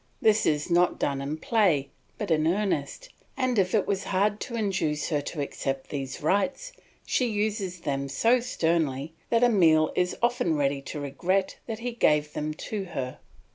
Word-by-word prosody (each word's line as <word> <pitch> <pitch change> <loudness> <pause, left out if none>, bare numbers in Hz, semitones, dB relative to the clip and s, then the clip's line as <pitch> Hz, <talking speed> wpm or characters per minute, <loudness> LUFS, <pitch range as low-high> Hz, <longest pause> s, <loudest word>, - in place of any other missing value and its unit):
This 220 0 +3
is 150 +3 0
not 175 +1 +3
done 140 -1 -1
in 145 +3 -3
play, 160 -8 +2 0.3
but 205 -5 -3
in 155 0 +3
earnest, 195 - -1 0.3
and 255 -4 +1
if 185 +2 +2
it 205 - +2
was 195 -1 -1
hard 205 +2 +1
to 235 - -5
induce 190 -9 -1
her 150 -3 +1
to 145 +1 -5
accept 135 -1 -4
these 135 -1 -5
rights, 275 - 0 0.3
she 250 - +1
uses 205 -4 -2
them 140 -3 -2
so 230 - +3
sternly 160 - -1 0.2
that 230 0 +3
Emile 165 -9 +5
is 180 0 0
often 240 -8 +1
ready 140 -1 0
to 145 +2 -6
regret 180 +7 -1
that 225 -2 -3
he 245 - -1
gave 150 -10 +2
them 150 +1 -2
to 200 +4 -4
her. 135 -7 -5
175 Hz, 175 wpm, -27 LUFS, 150-215 Hz, 0.3 s, Emile